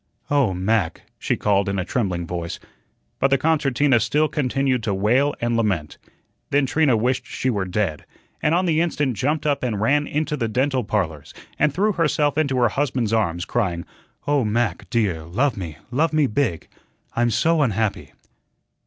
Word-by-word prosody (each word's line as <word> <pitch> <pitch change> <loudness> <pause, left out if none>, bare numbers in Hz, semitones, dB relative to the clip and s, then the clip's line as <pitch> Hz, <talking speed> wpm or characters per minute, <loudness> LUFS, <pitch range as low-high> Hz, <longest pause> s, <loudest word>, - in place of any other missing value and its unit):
"Oh, 140 -8 +3
Mac," 95 -2 0 0.2
she - - -1
called 100 -1 +1
in 100 - -1
a 90 - -1
trembling 95 -9 -1
voice. 85 0 -5 0.6
But - - +4
the 135 0 +3
concertina 140 -3 +2
still 145 +8 +2
continued 135 -3 0
to 105 -3 -1
wail 125 +9 +2
and 120 0 0
lament. 95 -10 -1 0.5
Then 145 0 +2
Trina 135 -2 +2
wished 125 +3 0
she 130 - -1
were 100 -4 -1
dead, 90 -4 -2 0.3
and 155 +2 +2
on 185 +1 +2
the 160 -2 +2
instant 145 -7 0
jumped 150 +8 -1
up 145 -2 +1
and 115 -5 -2
ran 145 +7 +2
into 150 0 -1
the 120 -6 -1
"Dental 130 +3 0
Parlors," 85 -9 -3 0.2
and 150 0 +3
threw 200 +8 +1
herself 150 -5 +1
into 140 -4 +1
her 120 -2 +4
husband's 125 -4 -1
arms, 85 -6 0
crying: 90 -8 -1 0.4
"Oh, 145 -2 +2
Mac, 115 +2 -1
dear, 100 -9 0
love 110 - 0
me, 85 -6 -6
love 155 +5 +1
me 155 -2 +3
big! 120 - -1 0.5
I'm 120 0 +2
so 160 +7 +2
unhappy." 110 -5 -1
125 Hz, 170 wpm, -22 LUFS, 100-145 Hz, 0.6 s, But